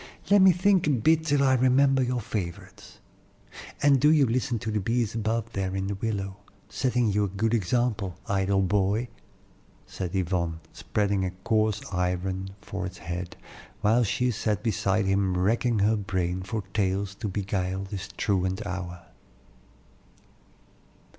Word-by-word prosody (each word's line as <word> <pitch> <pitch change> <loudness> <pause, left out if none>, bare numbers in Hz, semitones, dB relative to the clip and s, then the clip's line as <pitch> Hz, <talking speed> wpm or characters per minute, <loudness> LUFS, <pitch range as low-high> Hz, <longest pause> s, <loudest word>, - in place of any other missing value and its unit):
"Let 205 -1 +7
me 190 0 +8
think 185 0 +2
a - - +3
bit 155 +5 +2
till 145 -2 +3
I 135 -1 +4
remember 130 +1 +4
your 125 -1 0
favorites, 95 -5 -6 0.9
and 140 -3 +5
do 150 - +6
you 150 -3 +5
listen 120 0 0
to 110 0 -4
the 105 - 0
bees 115 +2 0
above 115 0 -2
there 95 -1 -2
in 95 0 -1
the 100 - -2
willow, 100 -2 -3 0.3
setting 125 -4 +1
you 105 +1 +2
a - - -3
good 110 +4 -1
example, 110 -3 0
idle 95 0 +1
boy," 100 +5 +1 0.8
said 90 0 -5
Yvonne, 85 -3 -1
spreading 100 -2 -1
a 95 - 0
coarse 110 +2 0
apron 90 +1 -1
for 100 -2 -5
his 90 -1 -10
head, 85 +1 -6 0.4
while 115 +4 +3
she 125 +3 0
sat 105 -2 -1
beside 100 -1 +1
him 95 -1 +1
racking 115 +5 +1
her 105 +2 +3
brain 95 -3 -2
for 100 +3 -4
tales 100 -1 0
to 105 +2 -5
beguile 95 -1 -2
this 95 -2 -6
truant 95 0 0
hour. 90 -3 -5
100 Hz, 150 wpm, -27 LUFS, 95-120 Hz, 0.9 s, me